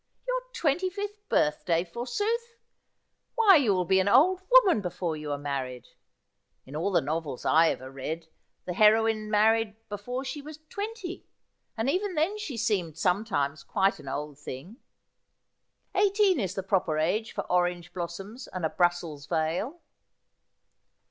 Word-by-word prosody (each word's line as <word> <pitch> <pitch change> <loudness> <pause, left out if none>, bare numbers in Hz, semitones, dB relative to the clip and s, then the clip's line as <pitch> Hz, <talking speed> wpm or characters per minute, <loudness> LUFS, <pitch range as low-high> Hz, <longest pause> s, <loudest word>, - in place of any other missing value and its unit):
' - - -44
Your - - 0
twenty 350 - +1
fifth 410 +2 -7
birthday, 165 +3 +2
forsooth! 415 - -3 0.8
Why, 435 -5 +7
you 255 -8 +3
will 180 -1 0
be 190 +2 +4
an 190 - +1
old 330 - +5
woman 420 - +6
before 175 -3 -3
you 150 -1 -5
are 145 - -1
married. 135 -4 -4 0.8
In 135 - -10
all 175 +6 0
the 180 - +3
novels 150 -2 -3
I 165 +1 +5
ever 130 +1 -4
read, 160 +5 -5 0.4
the 180 - -3
heroine 215 +2 +4
married 220 0 +3
before 245 +6 -4
she 270 +3 -5
was 300 +1 -9
twenty, 405 -3 -6 0.5
and 225 +3 -1
even 370 +5 0
then 350 +8 +1
she 290 - -5
seemed 195 -8 -1
sometimes 180 -6 0
quite 195 -1 +1
an - - -12
old 145 +1 -5
thing. 150 - -8 1.2
Eighteen 400 -2 +3
is 190 -3 -2
the 195 - -3
proper 180 -5 +1
age 205 +8 0
for - - -3
orange 175 -1 0
blossoms 190 +7 -6
and 185 -3 -4
a 160 - -1
Brussels 170 -5 0
veil.' 175 - -1
200 Hz, 150 wpm, -28 LUFS, -, 1.2 s, Why